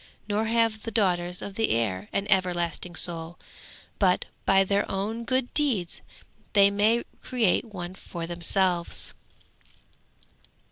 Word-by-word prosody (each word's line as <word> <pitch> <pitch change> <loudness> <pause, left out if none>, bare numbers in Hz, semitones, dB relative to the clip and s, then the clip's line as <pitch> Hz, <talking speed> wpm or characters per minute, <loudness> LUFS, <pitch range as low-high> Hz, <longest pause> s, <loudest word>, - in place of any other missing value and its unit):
Nor 215 +1 0
have 225 -1 +1
the 230 - -5
daughters 180 -5 0
of 200 - -6
the 225 +2 0
air 105 -4 -1
an 200 - -1
everlasting 175 -2 0
soul, 170 -1 +1 0.6
but 185 -3 +2 0.2
by 195 0 +5
their 200 +1 0
own 220 +4 -3
good 255 0 -1
deeds 240 - 0 0.5
they 200 -1 +6
may 215 +4 +2 0.2
create 240 -6 +1
one 185 -5 -7
for 170 -2 -7
themselves. 175 +1 +2
195 Hz, 125 wpm, -26 LUFS, 175-220 Hz, 0.6 s, they